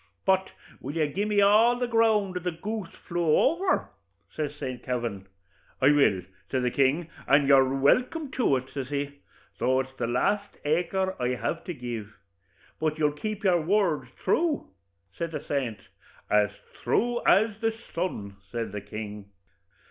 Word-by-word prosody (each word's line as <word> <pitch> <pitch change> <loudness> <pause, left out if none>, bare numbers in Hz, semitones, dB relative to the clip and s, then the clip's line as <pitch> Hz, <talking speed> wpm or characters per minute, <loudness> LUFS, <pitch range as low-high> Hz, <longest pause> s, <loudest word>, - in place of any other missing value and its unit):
'But 190 0 +3 0.3
will 140 +4 -6
you 160 -2 +2
gi'e 190 +8 -2
me 205 -1 +3
all 215 +4 +6
the 245 - 0
ground 220 -5 +2
the 180 0 -2
goose 205 +2 -5 0.2
flew 170 -3 +2
over?' 370 +5 +2 0.5
says 150 -1 -3
Saint 130 -4 -5
Kavin. 115 -7 -3 0.5
'I 140 +2 +6
will,' 140 -11 +4 0.3
says 125 -2 0
King 140 +4 +3
O'Toole, 165 - -13 0.3
'and 140 -1 +3
you're 135 -1 +5
welkim 255 - +2
to 245 - +2
it,' 130 0 -4
says 135 -2 -4
he, 145 0 -3 0.4
'though 130 +1 +3
it's 130 0 -9
the - - 0
last 200 - 0
acre 180 +5 0
I 125 +1 +1
have 165 +6 -3
to 175 - -4
give.' 115 -5 -6 0.6
'But 155 -1 0
you'll 150 -1 +2
keep 215 +8 -5
your 180 -4 +4
word 165 -6 +1 0.2
thrue?' 320 -3 +1 0.5
says 165 -1 -3
the 150 -1 -4
saint. 130 -7 -1 0.5
'As 105 -1 +4 0.3
thrue 240 +1 +1
as 215 +1 +4
the 225 0 +2 0.2
sun,' 105 - -3
says 115 -3 -3
the 105 0 -5
king. 105 -1 -7
155 Hz, 160 wpm, -27 LUFS, 130-200 Hz, 0.6 s, all